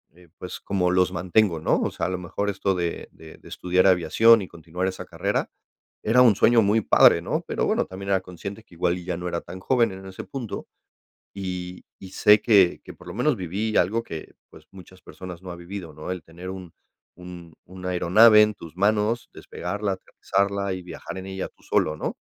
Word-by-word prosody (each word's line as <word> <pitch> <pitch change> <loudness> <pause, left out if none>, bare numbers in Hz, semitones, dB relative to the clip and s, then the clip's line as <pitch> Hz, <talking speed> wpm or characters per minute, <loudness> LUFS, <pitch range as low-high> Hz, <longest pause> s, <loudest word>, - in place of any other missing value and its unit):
eh, 90 0 -19
pues, 90 - -7
como 90 -3 0
los 90 0 +2
mantengo, 90 0 +1
¿no? 80 - +1
O - - -1
sea, - - -3
a - - -3
lo 95 - -2
mejor 90 +3 -3
esto 100 -1 -1
de 85 -1 -3
de 80 -1 -14
estudiar 90 +1 +1
aviación, 110 +5 +5
y 95 - -6
continuar 85 +3 -4
esa 95 - -5
carrera - - -2 0.5
era 115 +4 +4
un 120 -4 +7
sueño 115 -1 +5
muy 105 +2 +3
padre, - - +5
¿no? - - -2
Pero - - -1
bueno, - - +1
también 95 +1 -9
era 95 -1 +2
consciente 100 +4 -8
que 90 - -19
igual 85 +1 0
y 90 - -9
ya 90 -1 -3
no 90 +1 -5
era 85 -1 -3
tan 90 +2 -10
joven 115 +2 +2
en 95 0 -10
ese 95 -1 -8
punto. 125 -6 -6 0.7
Y 90 -2 -6
y 95 - -11
sé 105 +1 +5
que 100 -7 +4
que - - -11
por - - -17
lo - - -7
menos 125 +4 +1
viví 100 +5 -3
algo 110 +6 +2
que, 80 -8 -9 0.2
pues, - - -16
muchas 95 -1 -15
personas 90 -1 -10
no 95 - -8
ha - - -8
vivido, 85 -1 -8
¿no? 75 +4 -7
El 90 -3 -4
tener 85 +3 -10
un 95 -3 -9 0.4
un 90 -2 -11
una 90 0 -6
aeronave 105 +5 +6
en 105 0 +2
tus 85 -5 -12
manos, 105 +4 +1
despegarla, 100 +3 -4
aterrizarla 100 +1 -2
y 95 - -5
viajar 90 +1 -8
en 95 - -7
ella 95 0 -5
tú - - -30
solo, 75 - +1
¿no? - - -4
95 Hz, 210 wpm, -24 LUFS, 90-100 Hz, 0.7 s, un